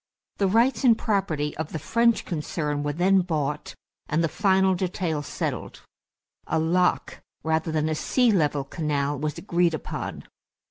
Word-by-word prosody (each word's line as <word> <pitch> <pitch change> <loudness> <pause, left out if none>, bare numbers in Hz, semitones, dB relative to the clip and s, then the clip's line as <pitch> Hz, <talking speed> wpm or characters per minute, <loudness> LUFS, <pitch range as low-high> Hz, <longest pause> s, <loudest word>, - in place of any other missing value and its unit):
The 200 - +2
rights 230 +4 +2
and 235 -4 +6
property 160 -8 -1
of 160 0 -5
the - - -1
French 230 +9 +2
concern 150 -2 -2
were 145 0 -1
then 185 +4 +3
bought, 150 -4 -3 0.3
and 160 +3 +1
the - - +3
final 190 +1 +2
details 175 -5 -2
settled. - - -4 0.7
A 160 - 0
lock 175 +3 +1 0.2
rather 160 0 0
than 155 -1 0
a 155 - 0
sea 245 +9 +2
level 150 -7 +1
canal 145 -1 -2
was 150 +1 -3
agreed 175 -3 +1
upon. - - -6
165 Hz, 150 wpm, -25 LUFS, 150-190 Hz, 0.7 s, and